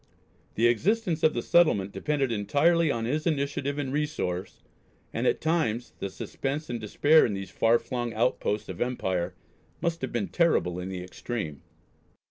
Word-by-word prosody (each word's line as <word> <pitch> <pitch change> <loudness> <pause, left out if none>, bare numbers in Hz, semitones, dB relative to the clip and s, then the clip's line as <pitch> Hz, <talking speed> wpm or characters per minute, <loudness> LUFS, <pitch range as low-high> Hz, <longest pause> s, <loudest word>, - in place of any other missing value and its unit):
The 115 - +2
existence 175 - +1
of 155 - +3
the 120 - -1
settlement 105 - +3
depended 140 -1 -1
entirely 145 +11 +3
on 115 -4 -1
his 155 +7 -1
initiative 140 -2 -1
and 135 -2 -2
resource, 145 - -3 0.5
and - - 0
at - - +2
times 140 -8 0
the 100 - -3
suspense 140 +9 -4
and 120 -2 -3
despair 145 +9 +4
in 105 - 0
these 95 0 -6
far 115 +1 +4
flung 120 -1 -3
outposts 110 -2 0
of 90 -2 -7
empire 95 -8 -1 0.4
must 170 -1 -1
have 130 - -3
been 115 -4 -2
terrible 125 - +2
in 90 +1 -5
the 90 -1 -5
extreme. 90 - -5
120 Hz, 160 wpm, -27 LUFS, 100-155 Hz, 0.5 s, despair